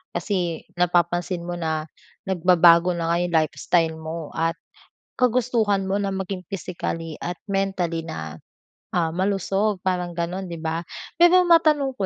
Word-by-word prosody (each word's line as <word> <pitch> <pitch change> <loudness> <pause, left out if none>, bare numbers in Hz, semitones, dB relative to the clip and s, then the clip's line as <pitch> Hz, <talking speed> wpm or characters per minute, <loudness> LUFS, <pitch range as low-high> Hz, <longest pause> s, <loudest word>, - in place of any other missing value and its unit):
Kasi 175 -6 -2 0.2
napapansin 175 0 +1
mo 175 0 -4
na 160 -1 -2 0.4
nagbabago 175 -1 +5
na 165 -1 -1
nga 170 - +2
'yong 175 -1 -1
lifestyle 160 +1 +1
mo 160 -1 -6
at 165 +1 0 0.6
kagustuhan 230 -5 +2
mo 190 - -1
na 200 -1 -1
maging 190 -1 -4
physically 165 -3 -4
at 175 0 -4
mentally 190 -4 -1
na, 80 - -6 0.6
ah, 170 -2 +1
malusog, 195 +1 0
parang 180 -2 -1
gano'n, 175 +3 -3
'di 170 - -5
ba? 160 +1 -2 0.4
Pero 350 +2 +7
matanong 305 -5 +4
ko 195 - -1
180 Hz, 140 wpm, -23 LUFS, 165-195 Hz, 0.6 s, Pero